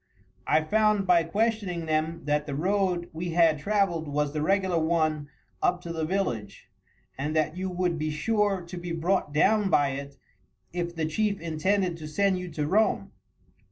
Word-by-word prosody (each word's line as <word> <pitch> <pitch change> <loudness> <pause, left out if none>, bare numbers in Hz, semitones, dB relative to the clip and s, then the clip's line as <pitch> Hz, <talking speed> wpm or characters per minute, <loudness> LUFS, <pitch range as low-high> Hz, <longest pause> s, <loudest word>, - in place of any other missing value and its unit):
I 155 - +3
found 215 +3 +2
by 180 -2 +5
questioning 200 -3 -1
them 160 +1 -1
that 150 0 0
the 140 - -3
road 180 +1 0
we 170 +1 -4
had 165 -3 +4
travelled 195 -4 0
was 145 0 -1
the 150 - -2
regular 190 0 +2
one 155 -2 0 0.3
up 180 0 +2
to 170 -1 -6
the 160 -1 -2
village, 120 - -3 0.5
and 150 +3 -2
that 155 0 +1
you 185 +1 -3
would 180 -2 -1
be 155 0 -1
sure 200 +4 0
to 175 +1 -8
be 175 -1 -5
brought 170 -1 0
down 200 +7 +3
by 145 -4 +3
it 140 +1 -6 0.6
if 175 -1 -3
the 160 -1 -1
chief 200 +5 0
intended 170 +2 0
to 155 -2 -8
send 190 +4 +1
you 180 0 -6
to 150 -3 -3
Rome. 210 +8 +1
170 Hz, 175 wpm, -27 LUFS, 155-195 Hz, 0.6 s, by